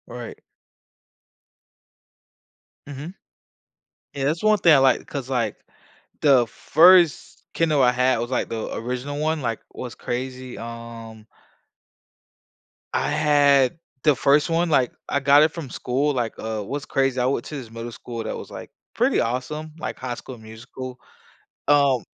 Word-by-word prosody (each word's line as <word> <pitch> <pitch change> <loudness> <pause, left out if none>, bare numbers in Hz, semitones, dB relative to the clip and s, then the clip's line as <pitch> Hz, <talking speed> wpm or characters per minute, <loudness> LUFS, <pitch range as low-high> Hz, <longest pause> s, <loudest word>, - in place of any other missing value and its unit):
Right. 120 -2 -8 2.5
Mhm. 145 +5 -8 1.0
Yeah, 140 -1 -3
that's 155 +4 0
one 215 0 +4
thing 170 -4 +6
I - - +6
like 135 -1 +3
'cause, 135 -3 -6
like, 115 -5 -1 0.6
the 135 -5 +5
first 170 +5 +4
Kindle 155 -4 +2
I 125 -1 +5
had 125 0 +2
was, 120 +2 -3
like, 125 - -1
the 115 -1 -4
original 125 +4 -4
one, 155 0 0
like, 115 -3 -2
what's 125 -2 -7
crazy, 130 0 -5
um 115 -1 -9 1.7
I - - 0
had 145 -1 +3 0.3
the 150 -2 +4
first 145 +5 +3
one. 165 +1 +1
Like, 130 -6 +2 0.2
I 140 - +1
got 140 +2 +6
it 155 - +2
from 160 -6 -7
school. 135 +5 -1
Like, 120 -4 -2
uh, 110 -1 -3
what's 140 +7 -5
crazy, 135 -1 0
I 125 - +1
went 130 -2 -1
to 155 - -7
this 125 -6 -8
middle 115 +1 -7
school 115 0 -7
that - - -4
was, - - -9
like, - - -9 0.2
pretty - - +2
awesome, 140 +6 -3
like, - - -5
High 125 -1 -4
School 125 +1 -10
Musical. 120 +3 -9 0.7
Um, 140 -5 +4
130 Hz, 150 wpm, -23 LUFS, 120-145 Hz, 2.5 s, thing